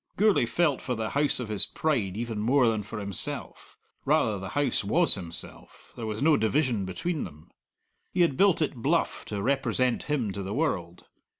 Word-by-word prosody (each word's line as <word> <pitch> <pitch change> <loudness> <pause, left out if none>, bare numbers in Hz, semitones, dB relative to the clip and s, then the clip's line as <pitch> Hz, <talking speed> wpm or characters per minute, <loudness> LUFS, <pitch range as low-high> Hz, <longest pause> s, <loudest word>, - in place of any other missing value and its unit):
Gourlay 205 - +3
felt 150 0 +1
for 125 - -2
the 110 -1 -3
house 145 -1 +2
of 125 - -4
his 105 -2 +4
pride 110 -12 -1
even 115 -2 -3
more 125 +4 +3
than 110 -2 +1
for 105 +2 -8
himself 100 -3 -5 0.3
rather 105 -3 +2
the 95 0 -6
house 140 -7 +1
was 165 - +5
himself; 85 -4 -10
there 115 - -5
was 110 +3 -3
no 155 0 +5
division 115 -3 +1
between 165 - -3
them. 75 -2 -11 0.6
He 180 - +1
had 165 -6 +3
built 190 -1 +4
it 150 - -2
bluff 150 +8 0
to 100 -2 -4
represent 130 -2 +1
him 130 -9 0
to 100 - -5
the 95 +2 -4
world. 90 - -2
120 Hz, 185 wpm, -27 LUFS, 105-150 Hz, 0.6 s, was